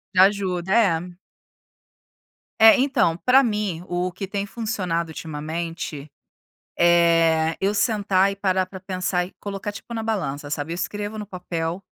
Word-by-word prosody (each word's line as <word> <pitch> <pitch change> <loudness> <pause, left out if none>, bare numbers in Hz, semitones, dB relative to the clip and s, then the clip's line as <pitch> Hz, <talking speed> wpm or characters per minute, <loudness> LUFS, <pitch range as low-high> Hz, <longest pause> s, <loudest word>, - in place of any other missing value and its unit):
Já 185 - +8
ajuda, 190 -2 +1 0.2
é. 175 +2 -8 1.5
É, 225 +2 +8
então, 255 -11 +2
para 260 +6 +5
mim, 210 -7 -2
o 180 +1 -2
que 195 +2 -6
tem 200 0 -3
funcionado 185 -7 -3
ultimamente 155 -1 -5 0.7
é: 165 -2 +4
Eu 195 +2 +1
sentar 200 -3 +2
e - - -6
parar 190 -2 +1
para 190 0 -10
pensar 180 -1 -1
e 185 - -14
colocar, 200 0 -5
tipo, 220 +3 -10
na 225 - -2
balança, 145 -10 -3
sabe. 150 +2 -3
Eu - - -4
escrevo 205 +4 -4
no 210 - -5
papel 175 -1 -4
185 Hz, 145 wpm, -23 LUFS, 170-205 Hz, 1.5 s, Já